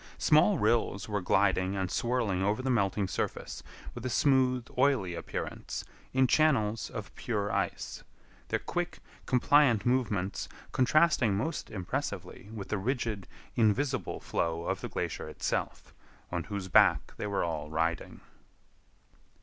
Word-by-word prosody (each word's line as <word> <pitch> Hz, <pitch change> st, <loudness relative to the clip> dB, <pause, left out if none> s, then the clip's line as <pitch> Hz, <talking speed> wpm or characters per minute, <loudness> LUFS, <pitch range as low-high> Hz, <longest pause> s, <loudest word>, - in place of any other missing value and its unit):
Small 160 Hz, +6 st, +5 dB
rills 110 Hz, -4 st, +1 dB
were 105 Hz, -2 st, -1 dB
gliding 95 Hz, 0 st, +2 dB
and 95 Hz, -2 st, -2 dB
swirling 115 Hz, -6 st, 0 dB
over 105 Hz, +6 st, 0 dB
the 130 Hz, -, +1 dB
melting 100 Hz, -3 st, +1 dB
surface -, -, -3 dB, 0.3 s
with 120 Hz, -, -8 dB
a 130 Hz, -, -1 dB
smooth, 130 Hz, -1 st, +3 dB
oily 125 Hz, -9 st, +2 dB
appearance, -, -, -5 dB, 0.3 s
in 130 Hz, 0 st, +4 dB
channels 125 Hz, -7 st, +2 dB
of 100 Hz, -4 st, -7 dB
pure 105 Hz, -4 st, -2 dB
ice—their -, -, -4 dB
quick, 175 Hz, 0 st, -3 dB, 0.3 s
compliant 130 Hz, -4 st, +4 dB
movements 110 Hz, -7 st, 0 dB, 0.2 s
contrasting 130 Hz, -5 st, +3 dB
most 160 Hz, +9 st, -3 dB
impressively 100 Hz, -2 st, -4 dB
with 105 Hz, -3 st, -7 dB
the 105 Hz, -, 0 dB
rigid, 115 Hz, -3 st, -2 dB, 0.3 s
invisible 120 Hz, 0 st, +1 dB
flow 85 Hz, 0 st, -1 dB
of -, -, -2 dB
the -, -, -4 dB
glacier -, -, -3 dB
itself, -, -, -3 dB, 0.4 s
on 85 Hz, -2 st, -2 dB
whose 100 Hz, 0 st, -4 dB
back 90 Hz, -, +4 dB
they -, -, -3 dB
all 85 Hz, -6 st, -1 dB
were -, -, -11 dB
riding. 80 Hz, +2 st, -2 dB
110 Hz, 130 wpm, -30 LUFS, 95-130 Hz, 0.4 s, Small